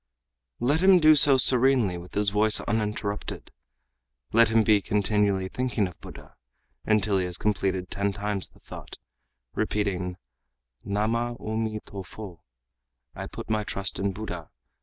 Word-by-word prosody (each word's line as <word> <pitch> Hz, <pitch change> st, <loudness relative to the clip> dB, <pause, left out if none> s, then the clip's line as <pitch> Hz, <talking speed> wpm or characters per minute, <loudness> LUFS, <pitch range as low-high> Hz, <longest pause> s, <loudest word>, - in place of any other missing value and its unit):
Let 145 Hz, +7 st, +1 dB
him 190 Hz, 0 st, +7 dB
do 155 Hz, -2 st, +6 dB
so 140 Hz, -2 st, +6 dB
serenely 125 Hz, -6 st, +3 dB
with 90 Hz, +1 st, -13 dB
his 100 Hz, -1 st, +3 dB
voice 105 Hz, +1 st, +3 dB
uninterrupted; 105 Hz, -1 st, -3 dB, 0.8 s
let 115 Hz, 0 st, +5 dB
him 110 Hz, 0 st, +3 dB
be 105 Hz, -2 st, +3 dB
(continually) 100 Hz, -1 st, 0 dB
thinking 120 Hz, -2 st, -1 dB
of 90 Hz, -, -13 dB
Buddha, -, -, -12 dB, 0.5 s
until 105 Hz, -2 st, +2 dB
he 90 Hz, -, -1 dB
has 90 Hz, 0 st, -3 dB
completed 95 Hz, -3 st, -1 dB
ten 100 Hz, 0 st, -1 dB
times 100 Hz, -1 st, -3 dB
the -, -, -24 dB
thought, -, -, -11 dB, 0.6 s
repeating 90 Hz, -4 st, -2 dB, 0.7 s
'Namah 115 Hz, +4 st, -1 dB
O 110 Hz, +1 st, -5 dB
mi 110 Hz, -1 st, -2 dB
to 100 Hz, -, -7 dB
fo,' 95 Hz, -2 st, -10 dB, 0.7 s
I -, -, -7 dB
put -, -, -9 dB
my 110 Hz, -1 st, 0 dB
trust 100 Hz, -2 st, -1 dB
in 100 Hz, 0 st, 0 dB
Buddha! 90 Hz, -5 st, -7 dB
105 Hz, 145 wpm, -26 LUFS, 95-115 Hz, 0.8 s, him